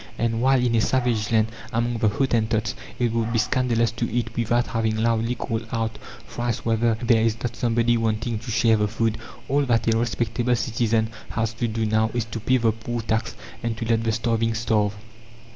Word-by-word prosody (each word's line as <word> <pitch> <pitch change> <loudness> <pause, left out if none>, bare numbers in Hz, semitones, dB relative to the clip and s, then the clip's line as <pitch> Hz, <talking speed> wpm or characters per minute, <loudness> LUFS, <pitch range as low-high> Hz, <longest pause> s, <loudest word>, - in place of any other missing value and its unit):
And 115 0 0
while 135 +1 +4
in 125 -1 +1
a 115 - +3
savage 120 -4 +1
land, 110 -1 +3 0.2
among 120 0 0
the 110 -2 +3
Hottentots, 110 -1 0 0.2
it 120 -2 +1
would 115 0 -1
be 115 - +1
scandalous 115 0 +1
to 115 - -3
eat 115 0 -2
without 120 +1 +1
having 110 -1 -1
loudly 115 +1 +1
called 115 -3 -3
out 115 -2 -2 0.3
thrice 120 -1 -3
whether 115 0 +2
there 115 -2 +4
is 115 0 +1
not 120 -1 -2
somebody 120 0 +2
wanting 115 0 -1
to 115 - -9
share 115 0 +3
the 105 0 +1
food, 110 +1 -1 0.3
all 140 +2 +2
that 115 -1 +2
a - - +1
respectable 120 +1 0
citizen 115 -2 0 0.2
has 115 0 -1
to 120 +2 -1
do 110 0 -1
now 110 +1 +2
is 120 -3 0
to 115 0 -6
pay 130 +4 +2
the 115 -2 +2
poor 115 +2 -4
tax 110 0 -1 0.3
and 115 -1 -2
to 115 - -3
let 115 0 +1
the 115 - +1
starving 115 0 0
starve. 105 -2 +1
115 Hz, 200 wpm, -24 LUFS, 110-120 Hz, 0.3 s, while